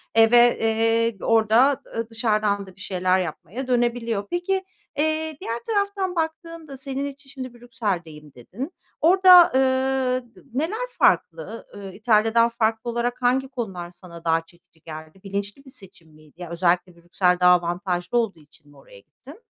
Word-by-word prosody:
eee, 225 0 +6
ve, 240 0 +6
eee, 225 0 +1
orada 225 +4 +4 0.3
ı 230 0 -3
dışarıdan 215 -3 0
da 185 - -14
bir 185 - -15
şeyler 185 0 +1
yapmaya 185 - -5
dönebiliyor. 235 -4 0
Peki, 375 +2 -1 0.3
eee, 315 0 -1
diğer 230 +1 -3
taraftan 400 -4 -1
baktığında 320 -2 -4
senin 270 +1 -4
için 280 0 -9
şimdi, 255 -2 -8
"Brüksel'deyim." 185 - -5
dedin. 220 - -8 0.3
Orada, 365 +2 +8
ııı, 260 -1 +1
d - - -16
neler 385 - -2
farklı? 360 - +1
Iıı, 195 -1 -8
İtalya'dan 225 +2 +3
farklı 225 0 -1
olarak 240 +1 -2
hangi 255 +2 +2
konular 195 -10 -6
sana 175 -2 -13
daha 165 0 +2
çekici 165 -1 -26
geldi? 155 +3 -10
Bilinçli 200 +7 -5
bir - - -13
seçim 190 -8 -14
miydi? 155 +2 -19
Ya, 175 - -7
özellikle 175 +1 0
Brüksel 180 +1 0
daha 180 0 +6
avantajlı 175 +4 -2
olduğu 225 -8 -1
için 150 0 -23
mi 145 - -19
oraya 135 -7 -16
gittin? 280 - -16
225 Hz, 155 wpm, -23 LUFS, 180-265 Hz, 0.3 s, Orada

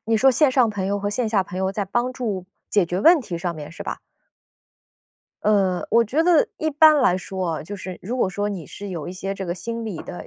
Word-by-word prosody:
你 225 0 +2
说 265 +4 +5
线 290 +2 +4
上 255 -4 +3
朋 195 -2 -3
友 200 +1 0
和 205 +1 -2
线 225 +1 -1
下 205 -3 +2
朋 185 0 -7
友 190 0 0
在 200 +1 -2
帮 240 +6 -1
助 210 -8 -3 0.2
解 200 -5 +3
决 180 +2 -2
问 330 - +6
题 180 -9 -5
上 170 0 -3
面 150 -1 -8
是 170 - -8
吧？ - - -5 1.4
呃， 195 -4 +2
我 230 +1 +5
觉 285 +9 +1
得 340 -3 +4
一 315 - -1
般 310 +1 +6
来 180 -8 +3
说 185 -4 -3
哦， - - -7
就 205 +6 -7
是 185 -2 -7
如 235 +7 -3
果 195 - +2
说 205 +1 -2
你 185 -7 -5
是 205 - -8
有 170 -6 -5
一 180 - -5
些 195 +1 -4
这 195 - -5
个 175 -1 -3
心 230 +4 -5
理 195 -7 -5
的 175 - -8
200 Hz, 270 characters per minute, -23 LUFS, 185-235 Hz, 1.4 s, 问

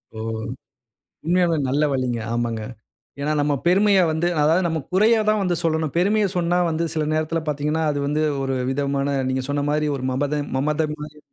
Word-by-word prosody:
ஓ! - - -6 1.1
உண்மையாவே 175 -1 +2
நல்ல 145 +3 +1
வழிங்க. 125 -3 -1
ஆமாங்க. 115 -2 -1 0.6
ஏன்னா 150 +2 0
நம்ம 145 0 +1
பெருமைய 195 +2 +4
வந்து 160 +2 0
அதாவது 165 +5 +3
நம்ம 165 -1 -1
குறையதான் 215 +2 +3
வந்து 180 -2 0
சொல்லணும். 160 -3 0
பெருமைய 205 +4 +3
சொன்னா 175 +1 +1
வந்து 165 +1 -1
சில 155 -1 0
நேரத்துல 155 +1 0
பாத்தீங்கன்னா, 150 +2 -1
அது 145 - -2
வந்து 150 +2 0 0.2
ஒரு 135 0 -1 0.2
விதமான 140 0 -1
நீங்க 130 0 -1
சொன்னமாரி 145 +1 0
ஒரு 130 - -6
மமதை 145 +2 -1
மமதை 150 +3 0
மாரி. 150 0 -9
155 Hz, 160 wpm, -22 LUFS, 145-175 Hz, 1.1 s, பெருமைய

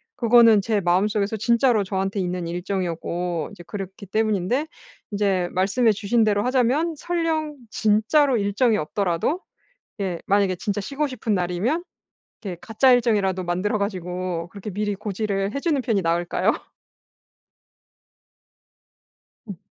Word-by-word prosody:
그거는 230 -3 +6
제 210 0 0
마음속에서 200 +4 +1
진짜로 235 0 +3
저한테 195 +1 -2
있는 180 -2 -2
일정이었고 175 -1 -3
이제 195 -4 -12
그렇기 195 -1 -7
때문인데 215 - 0 0.5
인제 195 -3 0
말씀해 200 +5 +2
주신 215 +3 +1
대로 205 -1 +2
하자면 260 +6 +1
설령 320 -2 -1
진짜로 220 +7 +3
일정이 210 +3 +2
없더라도 190 - -1 0.6
예 185 -4 -2
만약에 200 -2 +2
진짜 205 +3 -3
쉬고 275 +9 -2
싶은 235 -5 -2
날이면 185 - -1 0.6
이렇게 190 -5 -5
가짜 235 +4 +3
일정이라도 205 -7 +2
만들어 180 +5 -1
가지고 180 -3 -3
그렇게 200 +1 -8
미리 205 +1 -2
고지를 200 0 -2
해 280 - -2
주는 300 -2 +1
편이 225 -6 0
나을까요? 170 0 +1 2.9
음. 200 -5 -8
205 Hz, 310 characters per minute, -23 LUFS, 185-235 Hz, 2.9 s, 그거는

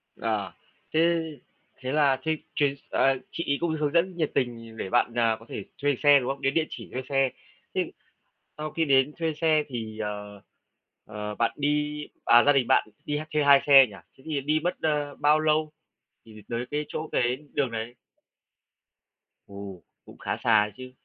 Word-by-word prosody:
À, 105 -5 -2 0.4
thế 165 +2 +4 0.7
thế 130 0 -3
là 140 -2 +3
thế 160 0 0 0.2
chuyến 140 -1 +2
ờ, 135 0 +3
chị 170 - -3
ấy 140 - +2
cũng 170 -1 0
hướng 150 -1 0
dẫn 175 +2 +2
nhiệt 155 -3 0
tình 115 -3 -3
để 95 - -4
bạn, 120 +1 +2
à, 115 -2 +2
có 115 - -15
thể 105 - -5 0.2
thuê 145 0 +2
xe, 145 -1 +7
đúng 125 -1 -3
không? 135 0 -4
Đến 135 0 +1
địa 160 0 +2
chỉ - - -9
thuê 130 - -2
xe. 135 -1 +2 0.5
Thế - - -1 0.7
sau 155 0 -4
khi 165 - 0
đến 135 0 +3
thuê 165 -1 0
xe 155 0 +2
thì, 110 -3 -6
ờ, 105 -1 -5 0.6
ờ, 105 0 -6
bạn 115 +1 +1
đi 150 +1 -1 0.2
à, 120 0 +7
gia 145 - +6
đình 135 -4 +2
bạn - - +3 0.2
đi 150 0 -1
ha 155 - -5
thuê 150 -1 +2
2 140 -1 +7
xe 135 -2 +9
nhỉ? 105 - -12 0.2
Thế 130 - -19
thì 150 -3 -1
đi 155 +3 +1
mất, 180 - 0
ơ, 150 -2 -1
bao 150 +1 +4
lâu 155 0 +1 0.5
thì 115 - -15
thì 105 - -12
tới 120 +1 -2
cái 150 +1 -1
chỗ 155 - -5
cái 125 +1 +1 0.2
đường 135 -4 +1
đấy? 115 +1 -5 1.5
Ồ, 100 -2 -9 0.2
cũng - - -14
khá - - -3
xa 110 -2 +5
đấy 105 - -9
chứ. 130 0 -9
135 Hz, 200 wpm, -26 LUFS, 115-150 Hz, 1.5 s, xe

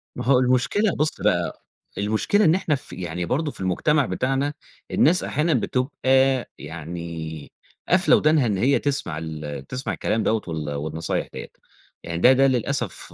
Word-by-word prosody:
ما 125 - -5
هو 130 0 +4
المشكلة 130 - +2
بُص 155 +2 -1
بقى، - - 0 0.4
المشكلة 110 - +1
إن 160 +2 +5
إحنا 160 -5 0
ف 130 - -3
يعني 90 -1 -4
برضه 145 - -1
في - - -7
المجتمع 140 - +1
بتاعنا، 135 +3 -1 0.4
الناس 175 +4 +4
أحيانًا 160 +2 0
بتبقى 125 +1 0 0.7
يعني 80 -1 -7 0.4
قافلة - - +5
ودانها 155 -3 +3
إن 105 -4 0
هي 130 +8 +2
تسمع 140 - -1
ال 75 -3 -6
تسمع 130 +1 -3
الكلام 110 - -1
دوّة 110 -1 +1
وال 80 -3 -4
والنصايح 80 +3 -3
ديّة. - - -7 0.6
يعني 85 0 -4
ده 125 - +7
ده 135 +1 +4
للأسف 125 -2 -1
125 Hz, 155 wpm, -23 LUFS, -, 0.7 s, ده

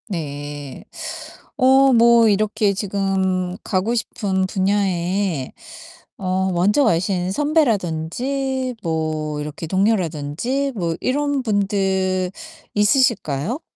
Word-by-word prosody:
네. 145 - -6 0.7
어 265 0 +5
뭐 235 -1 +6
이렇게 210 0 +1
지금 190 -2 -1
가고 195 +4 0
싶은 190 -4 -1
분야에 190 -5 0 0.7
어 190 0 -1
먼저 200 +11 +3
가신 180 -3 +1
선배라든지 260 - 0
뭐 155 -2 -2
이렇게 150 +2 -6
동료라든지 190 - 0
뭐 170 -5 -1
이런 285 0 0
분들 190 -3 0 0.4
있으실까요? 210 - +1
195 Hz, 190 characters per minute, -21 LUFS, 170-230 Hz, 0.7 s, 뭐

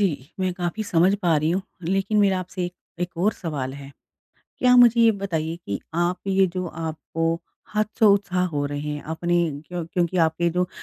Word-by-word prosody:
जी, 155 -7 -1
मैं 185 -1 +1
काफ़ी 175 +4 -2
समझ 185 -2 +3
पा 170 -3 +3
रही 155 +2 +1
हूँ, 185 +3 0 0.2
लेकिन 195 +4 +1
मेरा 195 -2 +3
आपसे 180 0 -4
एक 175 - -4 0.3
एक 175 -1 -3
और 195 +6 +2
सवाल 145 -9 -4
है। 140 -1 -10 0.7
क्या 250 0 +5
मुझे 240 -1 +7
ये 230 -1 +7
बताइए 165 -4 -2
कि 100 - -3
आप 175 +2 +1
ये 195 0 +4
जो 185 0 -1
आपको 165 0 -3 0.4
हतोत्साहित 205 -4 +3
हो 145 -4 -2
रहे 145 0 -3
हैं, 150 -1 -4
अपने 175 +1 0 0.3
क्यों 175 -1 -4
क्योंकि 175 0 -1
आपके 170 +2 0
जो 180 0 +2
175 Hz, 185 wpm, -24 LUFS, 160-195 Hz, 0.7 s, मुझे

